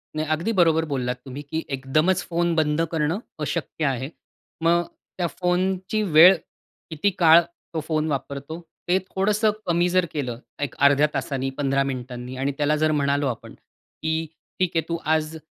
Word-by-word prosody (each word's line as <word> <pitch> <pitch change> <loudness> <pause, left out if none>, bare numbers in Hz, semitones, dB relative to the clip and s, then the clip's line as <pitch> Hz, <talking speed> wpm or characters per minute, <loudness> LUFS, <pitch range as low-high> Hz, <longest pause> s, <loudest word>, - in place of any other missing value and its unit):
नाही 155 0 -2
अगदी 170 +8 -2
बरोबर 160 -2 +4
बोललात 125 -2 -1
तुम्ही, 135 +2 -7
की 160 +3 -4
एकदमच 155 +8 +1
फोन 170 0 +1
बंद 155 0 +2
करणं 160 +3 0 0.2
अशक्य 155 +1 -2
आहे. 135 -1 -1 0.5
मग 170 +1 +4 0.4
त्या 175 -2 0
फोनची 185 +4 -1
वेळ, 175 +4 +10 0.6
किती 160 +5 +1
काळ 165 -1 +8 0.3
तो 160 - -1
फोन 155 -1 0
वापरतो 140 +3 -4 0.3
ते 180 - +5
थोडंसं 210 +3 +2
कमी 175 0 +2
जर 185 0 +3
केलं 125 -6 -3 0.2
1 145 -3 -3
अर्ध्या 145 +1 +5
तासाने 135 0 -2
15 135 -1 +1
मिनिटांनी 125 -1 -5
आणि 135 +2 0
त्याला 150 +1 +2
जर 155 - +3
म्हणालो 140 -1 +1
आपण, 120 -3 -5
की 160 0 -5 0.3
ठीक 185 -2 +2
आहे 165 - +3
तू 170 - 0 0.2
आज 155 0 -2
155 Hz, 160 wpm, -24 LUFS, 140-170 Hz, 0.6 s, वेळ